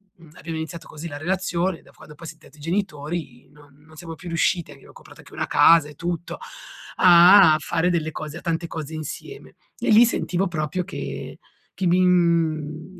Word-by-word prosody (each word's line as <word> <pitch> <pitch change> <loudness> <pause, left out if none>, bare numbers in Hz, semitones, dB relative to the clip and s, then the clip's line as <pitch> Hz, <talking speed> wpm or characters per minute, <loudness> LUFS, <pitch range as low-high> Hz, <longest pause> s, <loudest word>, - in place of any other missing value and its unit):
mhmm, 165 -2 -18
abbiamo 165 -1 -7
iniziato 160 +1 -7
così 155 +2 -8
la 145 - -7
relazione, 180 +1 -2
da - - -21
quando 150 - -15
poi 165 +2 -11
siam 155 0 -10
diventati 155 - -19
genitori 155 -5 -4
non 145 -1 -20
non 160 0 -18
siamo 165 0 -8
più 160 - -12
riusciti, 170 -1 0
abbiamo 140 -2 -16
comprato - - -16
anche - - -16
una - - -3
casa 165 -3 +5
e 150 - -14
tutto, 170 +2 -5 0.6
a 180 -1 +7
fare 170 +3 -1
delle 160 -3 -1
cose, 155 +1 -7
a - - -10
tante 170 0 -3
cose 160 -2 -7
insieme, 155 - -8 0.2
e - - -2
lì 225 +3 +7
sentivo 195 -4 -1
proprio 170 +1 -3
che - - -7 0.3
che 190 - -2
mi 175 +1 +3
mhmm, 165 -1 0
165 Hz, 185 wpm, -22 LUFS, 155-175 Hz, 0.6 s, a